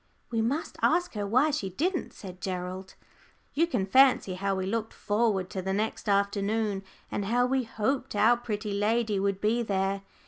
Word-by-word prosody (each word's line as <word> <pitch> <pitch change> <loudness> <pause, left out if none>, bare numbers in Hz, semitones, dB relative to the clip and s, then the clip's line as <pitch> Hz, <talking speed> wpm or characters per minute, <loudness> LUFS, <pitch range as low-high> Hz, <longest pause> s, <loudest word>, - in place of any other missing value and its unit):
"We 225 -1 +1
must 275 +8 -2
ask 355 +1 +2
her 205 -2 -3
why 255 +9 +3
she 210 -10 -2
didn't," 345 - -1
said 185 -2 -10
Gerald. 185 0 -5 0.6
You 330 +4 +2
can 200 - 0
fancy 255 -2 +4
how 195 +1 -1
we 190 0 -2
looked 225 +3 -2
forward 205 -3 0
to 190 - -3
the 190 +1 -2
next 215 +1 -2
afternoon, 200 +1 +1 0.3
and 205 - -2
how 245 +4 +2
we 260 0 0
hoped 235 +3 -2
our 220 +4 +5
pretty 215 -3 -4
lady 210 0 +1
would 195 0 0
be 220 +4 +1
there. 195 -2 -1
210 Hz, 175 wpm, -28 LUFS, 195-240 Hz, 0.6 s, our